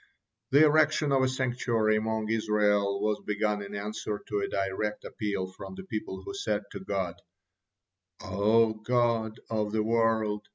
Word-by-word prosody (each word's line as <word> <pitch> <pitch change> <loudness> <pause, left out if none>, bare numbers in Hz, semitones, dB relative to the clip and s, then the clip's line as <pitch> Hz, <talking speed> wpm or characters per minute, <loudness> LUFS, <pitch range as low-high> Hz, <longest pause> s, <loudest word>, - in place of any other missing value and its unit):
'" - - -58
The 145 +3 +7
erection 150 -1 +3
of 135 -1 +4
a 130 - +3
sanctuary 120 -4 +1
among 110 0 -1
Israel 105 -2 +2
was 105 0 0
begun 105 0 0
in 100 0 -7
answer 105 0 -4
to 105 - 0
a 100 - -1
direct 100 +2 -2
appeal 100 -3 -2
from 140 - -9
the 190 - -8
people, 105 - -5
who - - -6
said 105 - -1
to 100 - -6
God: 95 -3 -3 1.0
"O 110 +2 +2
Lord 115 -3 +1
of 105 -2 0
the 110 0 +1
world! 110 -2 +1
110 Hz, 160 wpm, -29 LUFS, 105-115 Hz, 1.0 s, The